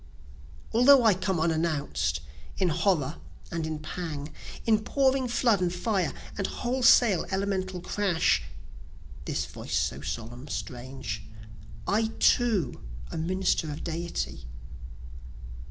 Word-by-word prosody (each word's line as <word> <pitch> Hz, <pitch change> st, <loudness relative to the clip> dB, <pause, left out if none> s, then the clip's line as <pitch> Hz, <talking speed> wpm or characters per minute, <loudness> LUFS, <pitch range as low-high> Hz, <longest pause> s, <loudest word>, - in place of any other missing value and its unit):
Although 255 Hz, +2 st, +7 dB
I 220 Hz, -2 st, +6 dB
come 185 Hz, -1 st, -1 dB
and 165 Hz, +1 st, +2 dB
unannounc'd, 110 Hz, -, -1 dB, 0.4 s
in 185 Hz, -2 st, +2 dB
horror 160 Hz, -3 st, +1 dB, 0.3 s
and 165 Hz, -2 st, -2 dB
in 155 Hz, -1 st, -3 dB
pang, 155 Hz, -2 st, -5 dB, 0.3 s
In 220 Hz, -2 st, +4 dB
pouring 265 Hz, +1 st, +2 dB
flood 235 Hz, -4 st, +2 dB
and 180 Hz, -1 st, +1 dB
fire, 185 Hz, -3 st, 0 dB, 0.3 s
and 200 Hz, -, +1 dB
wholesale 240 Hz, -6 st, +4 dB
elemental 190 Hz, -1 st, -1 dB
crash, 175 Hz, -, +2 dB, 0.8 s
(this -, -, -1 dB
voice -, -, -4 dB
so 70 Hz, -, -1 dB
solemn, 120 Hz, -, -6 dB
strange,) 125 Hz, -5 st, -5 dB, 0.7 s
I 220 Hz, +2 st, +2 dB
too 215 Hz, -, +2 dB, 0.3 s
a -, -, -4 dB
minister 180 Hz, -2 st, 0 dB
of 145 Hz, -, -6 dB
Deity. 165 Hz, -, -4 dB
175 Hz, 115 wpm, -28 LUFS, 150-205 Hz, 0.8 s, Although